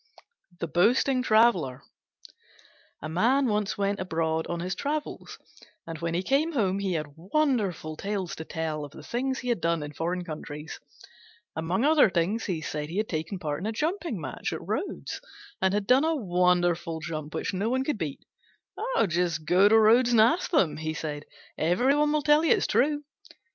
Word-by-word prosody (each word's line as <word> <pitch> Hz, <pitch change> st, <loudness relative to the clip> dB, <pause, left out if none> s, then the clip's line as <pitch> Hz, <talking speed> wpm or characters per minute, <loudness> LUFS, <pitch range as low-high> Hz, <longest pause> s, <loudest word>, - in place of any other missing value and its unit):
THE -, -, -1 dB
BOASTING 250 Hz, -, +3 dB
TRAVELLER 215 Hz, -, +3 dB, 1.2 s
A -, -, -3 dB
Man 235 Hz, -, +2 dB
once 210 Hz, -3 st, 0 dB
went 200 Hz, 0 st, 0 dB
abroad 160 Hz, -3 st, -1 dB
on 170 Hz, 0 st, -3 dB
his 180 Hz, +2 st, -2 dB
travels, 295 Hz, +5 st, -4 dB, 0.5 s
and 165 Hz, -1 st, -7 dB
when 170 Hz, 0 st, -2 dB
he 180 Hz, -, 0 dB
came 295 Hz, -, +1 dB
home 200 Hz, -7 st, +1 dB
he 195 Hz, -2 st, -1 dB
had 155 Hz, -2 st, -1 dB
wonderful 195 Hz, -, -1 dB
tales 195 Hz, 0 st, -3 dB
to 160 Hz, -, -5 dB
tell 160 Hz, -2 st, -3 dB
of 145 Hz, 0 st, -9 dB
the -, -, -11 dB
things 260 Hz, +2 st, -2 dB
he 250 Hz, -, -4 dB
had 235 Hz, -7 st, 0 dB
done 165 Hz, -2 st, 0 dB
in 145 Hz, 0 st, -7 dB
foreign 175 Hz, +4 st, -2 dB
countries. 155 Hz, -1 st, -7 dB, 0.8 s
Among 175 Hz, +9 st, 0 dB
other 305 Hz, -7 st, +5 dB
things, 185 Hz, +6 st, 0 dB
he 175 Hz, -6 st, -2 dB
said 150 Hz, 0 st, -4 dB
he 175 Hz, -, -5 dB
had 215 Hz, +1 st, -1 dB
taken 160 Hz, +4 st, -3 dB
part 150 Hz, -4 st, -3 dB
in 195 Hz, -, -4 dB
a -, -, -1 dB
jumping 315 Hz, -, -2 dB
match 135 Hz, -5 st, -4 dB
at -, -, -7 dB
Rhodes, 70 Hz, -, -4 dB, 0.4 s
and 190 Hz, 0 st, +3 dB
had 205 Hz, 0 st, 0 dB
done 255 Hz, +5 st, +5 dB
a 325 Hz, 0 st, +1 dB
wonderful 175 Hz, -, +1 dB
jump 155 Hz, -2 st, -6 dB
which -, -, -2 dB
no 200 Hz, +4 st, -1 dB
one 260 Hz, +2 st, +1 dB
could 270 Hz, -6 st, -2 dB
beat. 150 Hz, -5 st, -5 dB, 0.8 s
"Just 170 Hz, -2 st, -1 dB
go 185 Hz, +5 st, +5 dB
to 220 Hz, -, +6 dB
Rhodes 235 Hz, +3 st, +5 dB
and 230 Hz, -, +5 dB
ask 315 Hz, +11 st, +3 dB
them," 290 Hz, -, +2 dB
he 155 Hz, 0 st, -3 dB
said; 150 Hz, -1 st, -5 dB, 0.3 s
"every 240 Hz, -, +3 dB
one 295 Hz, 0 st, +2 dB
will 300 Hz, -1 st, +1 dB
tell 295 Hz, +2 st, +4 dB
you 330 Hz, -, +5 dB
it's -, -, -1 dB
true." 290 Hz, +2 st, +1 dB
185 Hz, 185 wpm, -27 LUFS, 160-245 Hz, 1.2 s, to